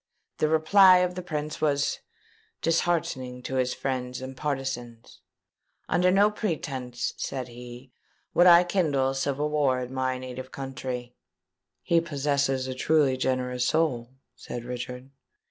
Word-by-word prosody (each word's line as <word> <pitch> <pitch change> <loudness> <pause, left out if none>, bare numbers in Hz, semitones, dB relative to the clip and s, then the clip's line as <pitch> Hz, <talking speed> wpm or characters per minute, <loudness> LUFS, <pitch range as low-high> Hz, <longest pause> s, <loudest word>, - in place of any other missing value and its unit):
The 155 - +3
reply 185 +4 +6
of 180 0 +1
the 180 - -5
Prince 150 -3 -4
was 140 -2 +1 0.6
disheartening 155 -7 0
to 130 - -3
his 125 -1 0
friends 125 -1 -3
and 130 +1 -7
partizans. 135 -5 -5 0.7
'Under 180 +1 +3
no 200 +3 +4
pretence,' 135 - -3
said 130 -2 -4
he, 120 +2 -11 0.4
'would 175 - +6
I 175 0 +8
kindle 150 -8 +1
civil 140 +2 -1
war 140 -4 +2
in 125 +1 -6
my 130 -1 -1
native 130 0 -8
country.'" 130 -2 -5 0.7
"He 170 -1 +3
possesses 140 -4 0
a 130 - -3
truly 140 0 +2
generous 125 -1 -1
soul," 130 -6 0 0.2
said 120 -1 -7
Richard. 125 +1 -6
135 Hz, 130 wpm, -27 LUFS, 125-155 Hz, 0.7 s, I